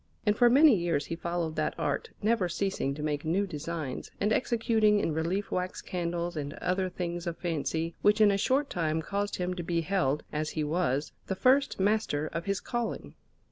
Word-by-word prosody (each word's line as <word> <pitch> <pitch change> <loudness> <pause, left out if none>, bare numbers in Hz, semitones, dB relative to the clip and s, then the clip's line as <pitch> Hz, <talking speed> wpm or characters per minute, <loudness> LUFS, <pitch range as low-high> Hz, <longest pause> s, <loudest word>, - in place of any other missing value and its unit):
And 210 -1 +3
for 240 +2 +5
many 280 +1 +7
years 170 -5 0
he 165 - -4
followed 170 -1 -2
that 155 - 0
art, 460 - -1
never 215 -4 +2
ceasing 175 -7 -1
to 150 - -6
make 150 -1 -1
new 175 +6 +1
designs, 160 -4 -5
and 210 +2 +2
executing 220 -3 +2
in 165 - 0
relief 175 +6 -1
wax 185 0 -2
candles 175 -1 -3
and 145 -2 -4
other 185 +1 -1
things 175 -1 -4
of 170 -1 -3
fancy, 165 0 -2
which 210 +1 +4
in 210 -2 +6
a - - +2
short 275 +7 +2
time 160 -2 0
caused 200 +4 -2
him 180 0 -2
to 180 - -4
be 170 0 0
held 160 -5 0
as 155 +1 -1
he 155 - +1
was 150 -3 0 0.2
the 190 - -1
first 260 +5 +3
master 195 -7 +1
of 165 +1 -3
his 200 0 0
calling. 230 - -4
175 Hz, 195 wpm, -29 LUFS, 160-205 Hz, 0.2 s, many